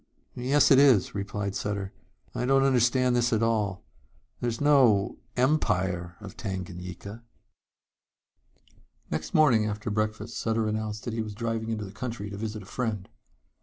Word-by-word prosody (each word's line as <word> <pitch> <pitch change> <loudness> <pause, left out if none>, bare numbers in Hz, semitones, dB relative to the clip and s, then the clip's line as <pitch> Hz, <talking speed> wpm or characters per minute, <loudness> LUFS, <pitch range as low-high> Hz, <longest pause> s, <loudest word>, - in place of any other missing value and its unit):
"Yes, 135 +5 +3
it 135 - +8
is," 130 -9 +5
replied 100 0 -3
Sutter. 100 -2 -3 0.4
"I - - -2
don't 135 0 +4
understand 125 -1 +3
this 120 +1 +2
at 110 -1 +2
all. 105 -5 0 0.6
There's 120 -1 -2
no 130 -9 +4 0.2
Empire 95 - +1
of 100 -3 -10
Tanganyika." 95 +1 -6 1.9
Next 75 - -3
morning 125 -9 +5
after 105 +1 -4
breakfast 110 +1 -2
Sutter 110 -1 0
announced 110 0 -3
that 120 - -4
he 115 - -1
was 105 -2 -6
driving 115 0 -3
into 110 -2 -3
the 95 - -9
country 110 -2 -5
to 100 - -6
visit 110 -1 -5
a - - -14
friend. 105 -3 -3
110 Hz, 145 wpm, -27 LUFS, 100-120 Hz, 1.9 s, it